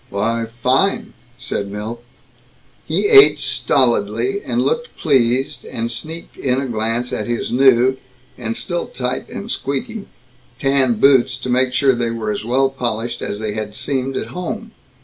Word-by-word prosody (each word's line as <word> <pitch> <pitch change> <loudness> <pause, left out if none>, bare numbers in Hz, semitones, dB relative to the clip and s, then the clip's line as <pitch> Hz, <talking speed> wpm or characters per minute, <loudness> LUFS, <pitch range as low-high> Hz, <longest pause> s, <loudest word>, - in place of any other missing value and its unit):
"Why, 115 +3 -1 0.2
fine," 135 +10 +2 0.2
said 130 -6 -3
Milt. 110 +4 -6 0.8
He - - +1
ate 415 -1 +8
stolidly, 400 +1 +1
and - - 0
looked 480 +1 -2
pleased, 130 -4 +1
and 115 0 -4
sneaked 160 +8 -6
in 130 -1 0
a 135 - -2
glance 115 +1 -2
at - - -3
his 120 -1 -2
new 130 0 +4 0.4
(and 115 -2 -4
still 175 -1 -3
tight 125 -1 -4
and 215 +4 -6
still - - -3
squeaky) 220 - -4 0.5
tan 135 -2 +2
boots 130 +2 +4
to 130 - -6
make 125 0 +2
sure 135 -1 +4
that 120 - -2
they 115 - 0
were 115 -2 -2
as 105 - -4
well 135 +4 +2
polished 120 -2 -3
as 100 - -3
they 110 -1 -3
had 105 -1 -5
seemed 130 0 -2
at - - -4
home. 215 +6 -5
125 Hz, 165 wpm, -19 LUFS, 115-140 Hz, 0.8 s, ate